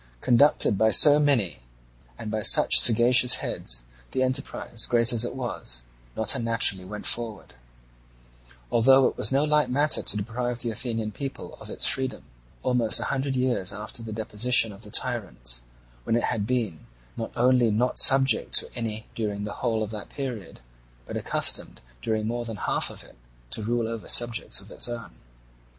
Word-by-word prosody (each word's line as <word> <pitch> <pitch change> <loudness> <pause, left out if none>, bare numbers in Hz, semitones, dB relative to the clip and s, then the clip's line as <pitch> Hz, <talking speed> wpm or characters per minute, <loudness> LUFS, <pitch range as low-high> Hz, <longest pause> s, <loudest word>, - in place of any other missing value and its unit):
Conducted 120 - +3
by 110 - +3
so 145 +5 +6
many 120 - 0 0.6
and 105 - -7
by 110 -1 -3
such - - +7
sagacious 120 +2 +6
heads, - - -3 0.3
the 130 - 0
enterprise, 130 -3 -2
great 120 0 +3
as 115 -1 +3
it 120 - -4
was, 90 - -6 0.3
not 110 -1 +2
unnaturally 115 -5 +1
went 105 +2 -9
forward; 115 -4 -3 1.2
although 130 +3 +4
it - - -1
was - - -1
no 135 +2 +1
light 150 -3 +1
matter 145 +4 +2
to - - +1
deprive 120 +3 -4
the 120 - -3
Athenian 110 -1 -4
people 135 +5 -8
of - - -12
its - - +1
freedom, 130 -1 -1 0.4
almost 120 -3 +1
a - - -3
hundred 135 0 -3
years 125 -7 -1
after 105 +3 -6
the 115 -1 -8
deposition 110 +1 +2
of 100 - -15
the 105 - -11
tyrants, 100 - -2 0.4
when 115 - -1
it 120 - -1
had 105 -3 -4
been 115 - -3 0.3
not 115 - -6
only 125 -1 +2
not 120 +4 -1
subject 135 -3 +3
to - - +3
any 110 -2 -5
during 105 -2 -4
the 105 0 -6
whole 110 -1 -1
of 105 - -6
that 105 -2 -9
period, 125 - -8 0.4
but - - -8
accustomed - - +1 0.2
during 110 - -2
more 120 +2 -3
than 115 -2 -7
half - - -1
of - - -10
it - - -20 0.3
to - - -2
rule 115 +1 -2
over 115 -1 -7
subjects 120 -1 +3
of - - -13
its - - -3
own. 120 -1 -8
115 Hz, 170 wpm, -24 LUFS, 105-125 Hz, 1.2 s, such